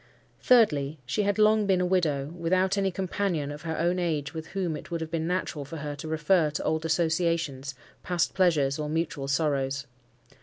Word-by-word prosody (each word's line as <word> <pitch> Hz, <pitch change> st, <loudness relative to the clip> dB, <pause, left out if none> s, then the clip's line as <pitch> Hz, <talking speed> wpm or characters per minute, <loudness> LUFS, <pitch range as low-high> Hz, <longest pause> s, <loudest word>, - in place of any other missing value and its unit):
Thirdly, 155 Hz, -, +4 dB
she 130 Hz, -, 0 dB
had 205 Hz, 0 st, 0 dB
long 215 Hz, -1 st, +4 dB
been 190 Hz, -2 st, +3 dB
a 180 Hz, -, +1 dB
widow, 155 Hz, -7 st, +1 dB
without 185 Hz, +3 st, +1 dB
any 195 Hz, -1 st, +1 dB
companion 185 Hz, -5 st, -2 dB
of 145 Hz, +1 st, -8 dB
her 160 Hz, -1 st, -4 dB
own 175 Hz, +2 st, +1 dB
age 150 Hz, -5 st, -1 dB
with 160 Hz, 0 st, -6 dB
whom 180 Hz, -4 st, -2 dB
it -, -, -9 dB
would 170 Hz, -, -2 dB
have 160 Hz, 0 st, -5 dB
been 165 Hz, -1 st, -1 dB
natural 180 Hz, -4 st, -2 dB
for 150 Hz, +4 st, -8 dB
her 145 Hz, -1 st, -5 dB
to 150 Hz, -, -7 dB
refer 160 Hz, +1 st, +2 dB
to 150 Hz, -, -4 dB
old 160 Hz, +1 st, -1 dB
associations, 160 Hz, -4 st, 0 dB, 0.3 s
past 175 Hz, -3 st, 0 dB
pleasures, 155 Hz, -7 st, +2 dB
or 150 Hz, 0 st, -3 dB
mutual 155 Hz, -3 st, -2 dB
sorrows. 140 Hz, -2 st, 0 dB
160 Hz, 190 wpm, -27 LUFS, 150-180 Hz, 0.3 s, Thirdly